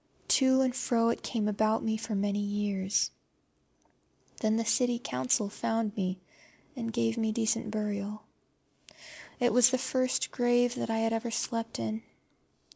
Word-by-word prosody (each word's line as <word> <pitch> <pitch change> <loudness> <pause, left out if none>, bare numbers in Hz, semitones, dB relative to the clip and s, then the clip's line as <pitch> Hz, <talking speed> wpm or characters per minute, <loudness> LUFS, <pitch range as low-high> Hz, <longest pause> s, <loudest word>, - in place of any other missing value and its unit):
To 260 -1 +5
and 255 -1 +1
fro 230 -3 +2
it 235 - -1
came 220 -4 -1
about 215 +1 +1
me 220 -1 0
for 220 0 -4
many 200 +1 0
years. 205 -1 0 1.3
Then 220 0 +2
the 230 - +1
County 245 +1 +2
Council 130 - 0
found 220 +1 -2
me, 185 -2 -1 0.6
and 230 -3 -3
gave 230 0 0
me 220 -1 +1
decent 220 0 0
burial. 210 0 -3 1.2
It 245 -2 +2
was 250 0 +7
the 255 - +1
first 255 0 0
grave 245 0 +2
that 245 - -4
I 225 - 0
had 225 0 +1
ever 225 +1 -2
slept 230 0 -3
in. 110 -1 -3
225 Hz, 150 wpm, -30 LUFS, 210-240 Hz, 1.3 s, was